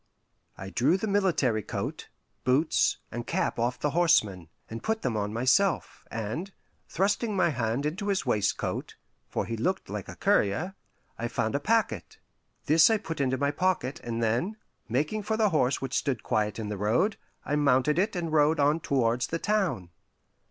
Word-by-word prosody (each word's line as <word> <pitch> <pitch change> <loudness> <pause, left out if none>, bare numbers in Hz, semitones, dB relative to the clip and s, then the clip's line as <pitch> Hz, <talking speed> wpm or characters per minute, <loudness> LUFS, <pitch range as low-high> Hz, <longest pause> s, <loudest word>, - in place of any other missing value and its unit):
I 95 0 -7
drew 145 - +3
the 195 - -3
military 185 - +1
coat, - - -5 0.3
boots, 135 +6 +2
and 120 0 -5
cap - - -1
off 120 +2 0
the 150 - 0
horseman, 105 - +2 0.2
and 115 +1 -7
put 220 0 -2
them 125 -4 0
on 105 -1 -1
myself; 130 - +1
and 115 - -4 0.4
thrusting 205 +4 0
my 185 -2 +3
hand 125 -1 -1
into 185 +7 -2
his 195 -7 0
waistcoat 105 -5 -1 0.3
for - - -2
he 115 - -3
looked 185 +13 -2
like - - -5
a - - -8
courier 180 - +1 0.5
I 120 - -1
found 110 -2 -1
a 140 - +1
packet. 190 - 0 0.5
This 160 +6 +6
I 225 - +3
put 165 -7 -5
into 130 -1 +1
my 140 +1 +1
pocket, 170 -5 0
and 115 -1 -2
then, 125 - 0 0.3
making 150 - 0
for 220 +2 -1
the 215 -2 +3
horse 140 -6 +1
which 135 -1 -4
stood 130 -7 -2
quiet 105 -1 0
in 110 -2 -4
the 105 - -3
road, 120 - +1 0.3
I 145 - 0
mounted 145 +2 +3
it 205 +2 +1
and 165 -3 -3
rode 150 +1 +4
on 145 +3 +3
towards 125 -5 +1
the 165 - -2
town. 165 - -1
140 Hz, 175 wpm, -28 LUFS, 115-185 Hz, 0.5 s, This